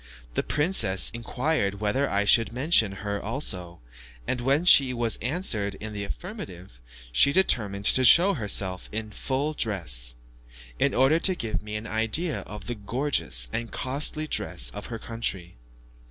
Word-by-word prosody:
The - - 0
princess 145 - +2
inquired 120 -3 -2
whether 110 +7 0
I 100 +1 0
should 115 +1 +4
mention 125 -4 +3
her 100 0 -3
also, 90 - -3 0.5
and 125 - -2
when 140 +7 +1
she 135 -7 +5
was 115 -2 -1
answered 115 - -1
in 110 +2 -7
the 100 -1 -5
affirmative, 95 - -9 0.3
she - - +4
determined 105 - +1
to 130 - +3
show 180 +9 +7
herself 100 - -1
in 110 0 -5
full 140 +7 -2
dress, 75 - -2 0.6
in - - +1
order 135 +6 +3
to 185 +1 +3
give 115 -9 -3
me 105 0 -7
an 105 +1 -5
idea 115 +9 0
of 105 -2 -9
the 120 - -4
gorgeous 115 - -1
and 115 0 -3
costly 145 +4 +1
dress - - 0
of - - -8
her 115 - -6
country. 100 - -4
115 Hz, 155 wpm, -26 LUFS, 100-140 Hz, 0.6 s, show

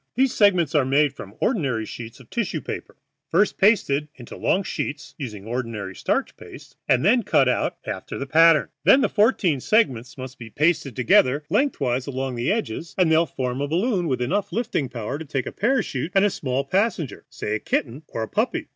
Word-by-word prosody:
These 260 +1 +2
segments 180 - +3
are 150 -3 +4
made 140 +2 +2
from 100 -6 -10
ordinary 135 - 0
sheets 115 0 -9
of - - -16
tissue - - -2
paper, - - -7 0.3
first 195 +5 +2
pasted 170 -8 +3
into 120 -2 -10
long 195 - +1
sheets 150 - -5
(use 125 -7 -5
ordinary 110 -2 -5
starch - - -1
paste) - - -13
and 125 +4 +3
then 240 +5 +5
cut 135 - +3
out 125 - 0
after - - -5
the 140 - -4
pattern. 165 +2 +5
Then 275 - +6
the - - +2
fourteen 205 - +2
segments 130 - +1
must 130 0 -8
be 115 -2 -9
pasted 150 -2 0
together 130 +3 +3
lengthwise 140 - 0
along 135 -1 -3
the 120 0 -1
edges, 170 - -3
and 180 -4 +3
they 160 - +5
will 165 +1 +3
form 130 -1 -3
a 145 - -1
balloon 180 - 0
with 130 -4 0
enough 200 +11 -1
lifting 215 - -1
power 120 +3 -5
to - - -5
take 135 -3 -3
up - - -6
a - - -42
parachute 195 - 0
and 195 0 +4
small 130 -1 -2
passenger, 185 - -1
say 105 - -4
a 105 - 0
kitten 120 +7 -2
or 115 - -4
a - - -4
puppy." 255 +10 -1
145 Hz, 200 wpm, -23 LUFS, 125-195 Hz, 0.3 s, Then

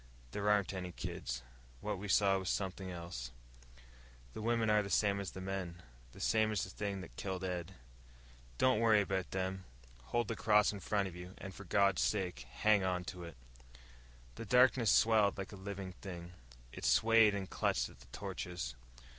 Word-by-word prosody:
"There 105 0 -1
aren't 105 -2 +2
any 90 -1 -4
kids. 65 -6 -5 0.4
What 105 +3 -3
we 105 - -5
saw 95 0 +4
was 95 - -3
something 95 -1 -2
else. 85 -8 -6 1.0
The - - -6
women 115 0 +1
are 105 0 +4
the 100 - -5
same 100 +2 +2
as 100 - -3
the 95 - -8
men, 95 -3 -4 0.3
the - - -14
same 110 -1 +2
as 105 - 0
the 90 - -6
thing 100 -1 -3
that - - -11
killed 95 -1 -3
Ed. 90 0 -3 0.8
Don't 130 -4 +4
worry 110 -2 +5
about 95 -2 -1
them. 95 0 -2 0.4
Hold 120 - 0
the 115 - -2
cross 105 0 +4
in 100 - -6
front 100 +1 0
of 90 - -8
you, 90 +1 -9
and 95 - -8
for 100 - -10
God's 100 +1 +3
sake 90 - -1
hang 105 +4 +3
onto 90 -1 -2
it!" 85 -5 -9 1.0
The 115 - -5
darkness 125 0 +5
swelled 110 -3 +4
like 95 -1 -5
a - - -8
living 95 -1 -6
thing. 90 -2 -7 0.4
It - - -8
swayed 115 -2 +5
and 95 -1 -3
clutched - - 0
at - - -16
the - - -16
torches. 90 -4 -5
95 Hz, 180 wpm, -35 LUFS, 90-105 Hz, 1.0 s, worry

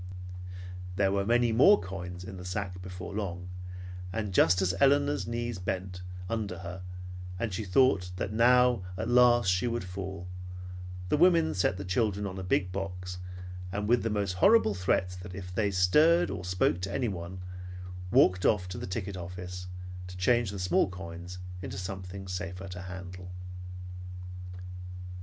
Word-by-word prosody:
There 95 0 +3
were 100 0 +1
many 120 0 +4
more 140 - +7
coins 90 -1 -6
in 95 0 -7
the 90 - -7
sack 90 -1 -3
before 90 +1 -7
long, 90 -3 -3 0.6
and 105 -2 -2
just 90 0 +6
as 95 -2 +2
Elinor's 140 0 +4
knees 120 -3 -2
bent, 90 0 -3 0.3
under 105 -4 -2
her, 90 +1 -5 0.6
and 110 0 -2
she 100 - -2
thought 95 -2 +4
that 95 +3 -2
now 125 0 +5 0.2
at 110 - -2
last 120 -4 +6
she 90 +6 +2
would 120 -3 -1
fall, 95 -1 -5 0.8
the - - +3
women 165 -1 +5
set 90 0 +2
the 100 - -5
children 100 +1 +1
on 95 -1 -4
a - - -4
big 90 0 +1
box, 90 -1 -4 0.5
and 100 +2 -1
with 120 +2 +4
the 115 - 0
most 100 -3 0
horrible 110 - +5
threats 90 0 0 0.2
if 90 -1 -7
they, 100 +1 +2
stirred 150 - +5
or 95 -2 -4
spoke 90 -1 +1
to 95 +2 -2
anyone, 95 -7 -2 0.7
walked 90 0 +5
off 95 -4 +3
to 90 - -5
the - - -5
ticket 95 +1 -3
office 90 0 -6 0.4
to 90 0 -8
change 120 +3 +3
the 100 - -5
small 90 0 +3
coins 90 0 -7 0.2
into 95 - -5
something 95 0 -5
safer 90 +1 -4
to 90 -1 -6
handle. 90 0 -7
95 Hz, 155 wpm, -30 LUFS, 90-110 Hz, 0.8 s, more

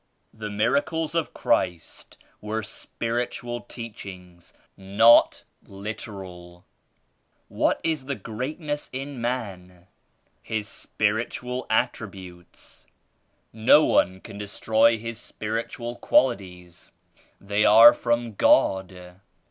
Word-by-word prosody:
" - - -46
"The 110 -1 -7
miracles 145 +9 0
of 165 -2 -1
Christ 90 -3 -2 0.2
were 110 +1 -3
spiritual 120 +3 -4
teach 115 -2 -9
ings, 90 -3 -12 0.2
not 100 +5 +4 0.2
literal." 95 -3 -8
12 - - -19
f 90 - -28 0.8
("What - - 0
is 160 -4 -1
true 140 0 -3
greatness 145 - -5
in 135 -1 -6
man?" 95 -8 -5 0.6
"His 110 -2 -4
spiritual 120 +5 -3
attributes. 95 -5 -4 0.7
No 115 +7 +5
one 95 0 +1
can 105 -3 -10
destroy 110 +2 +2
,his 115 0 -6
spiritual 115 +2 -5
qualities; 90 -8 0 0.5
they 100 +1 0
are 115 +3 +9
from 120 -1 -1
God." 90 -2 +1
110 Hz, 100 wpm, -25 LUFS, 95-120 Hz, 0.8 s, are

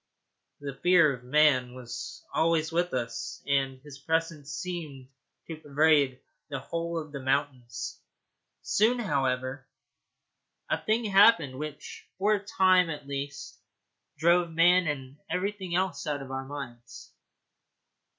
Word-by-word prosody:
The 140 -1 -5
fear 175 -5 +5
of 125 -1 -10
man 130 -2 +3
was 125 -2 -8
always 160 -1 +2
with 175 +1 0
us, 120 -2 -4
and 135 -2 0
his 145 -2 -11
presence 160 -1 -2
seemed 150 -5 -6 0.4
to 160 - -7
pervade 145 -3 +2 0.3
the 140 - -3
whole 170 +5 -4
of 155 -2 -5
the 140 - -6
mountains. 130 -3 -2 0.6
Soon, 225 +4 +3
however, 135 - -1 1.0
a - - -1
thing 225 +2 +1
happened 195 - +5
which 150 -1 -8
for 205 +3 +3
a 205 -1 -1
time 185 -3 +4
at 150 -3 -6
least 140 0 -6 0.6
drove 170 +2 +3
man 175 +2 +4
and 135 -2 -4
everything 190 -1 -2
else 185 -3 -1
out 145 -2 -2
of 135 - -10
our 135 0 -4
minds. 125 -4 -9
150 Hz, 130 wpm, -28 LUFS, 135-175 Hz, 1.0 s, fear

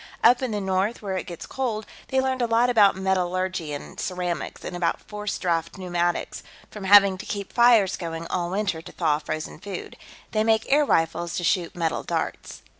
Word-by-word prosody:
Up 245 +1 +6
in 260 - -1
the 210 -2 -2
north, 190 +3 -1
where 195 -2 -2
it 185 - -4
gets 170 -2 -7
cold, 230 -5 -3 0.2
they 265 0 +1
learned 260 -1 0
a 240 - +2
lot 235 +2 +3
about 210 -4 +5
metallurgy 185 -3 -1
and 145 - -7
ceramics, 180 -4 -3
and 180 - -5
about 175 -1 0
forced 210 -1 -5
draft 170 -1 -1
pneumatics, 175 -2 -1 0.3
from 210 -2 -7
having 195 -1 +7
to - - -7
keep 200 -2 -5
fires 235 -5 +5
going 165 -1 -5
all 175 0 -2
winter 195 -3 -1
to - - -11
thaw 155 -4 +1
frozen 155 0 -5
food. 195 -3 -7 0.4
They 215 0 +1
make 220 0 +2
air 295 +1 +5
rifles, 165 - 0
to 175 - -2
shoot 175 -1 +1
metal 165 -2 -1
darts." - - -4
190 Hz, 190 wpm, -25 LUFS, 175-215 Hz, 0.4 s, having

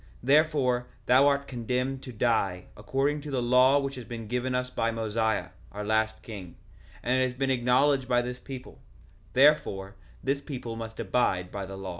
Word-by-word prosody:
1:14 - - -25 0.2
Therefore 135 -3 +3 0.2
thou 130 +3 +6
art 140 0 +1
condemned 125 +2 -2
to 130 - -8
die, 105 -6 0
according 135 +8 -1
to 150 - -8
the 135 -2 -1
law 125 +3 +5
which 140 -1 -1
has 125 -2 -7
been 115 -2 -7
given 125 +2 -1
us 125 0 -1
by 115 -2 0
Mosiah, 110 -1 -1 0.2
our 105 +1 -5
last 110 +1 0
king; 95 -6 -9 0.5
and 130 +1 +2
it - - +4
has 125 -1 -4
been 135 0 0
acknowledged 130 +2 +3
by 120 -1 +2
this 125 0 -5
people; 130 -2 -9 0.5
therefore 125 -9 +3 0.3
this 140 +1 0
people 125 -6 -6
must 115 0 -7
abide 95 -4 0
by 100 -1 -5
the 95 0 -7
law. 95 -1 -6
125 Hz, 185 wpm, -28 LUFS, 110-135 Hz, 0.5 s, thou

